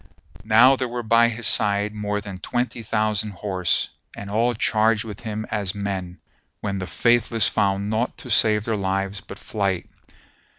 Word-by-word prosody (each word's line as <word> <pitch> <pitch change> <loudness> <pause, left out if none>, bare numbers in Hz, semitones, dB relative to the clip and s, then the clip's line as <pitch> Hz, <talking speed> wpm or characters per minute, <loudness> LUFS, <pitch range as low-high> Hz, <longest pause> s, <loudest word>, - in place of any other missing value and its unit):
Now 120 +5 +6
there 130 - -1
were 120 0 -4
by 115 +1 +5
his 120 0 -5
side 105 0 +1
more 105 -1 -2
than 100 -2 -8
twenty 120 +2 -2
thousand 110 -1 -1
horse, 95 -1 0 0.3
and 100 0 -7
all 120 +3 +2
charged 110 0 +2
with 105 -3 -8
him 110 -2 -4
as 100 -2 -1
men, 95 -3 -4 0.4
when 100 -1 -3
the 95 - -4
Faithless 115 +4 +2
found 100 +1 0
naught 115 +3 -1
to 130 -6 -8
save 105 -1 +4
their 115 - 0
lives 95 0 -2
but - - -10
flight. 100 -4 -2
105 Hz, 165 wpm, -23 LUFS, 100-115 Hz, 0.4 s, Now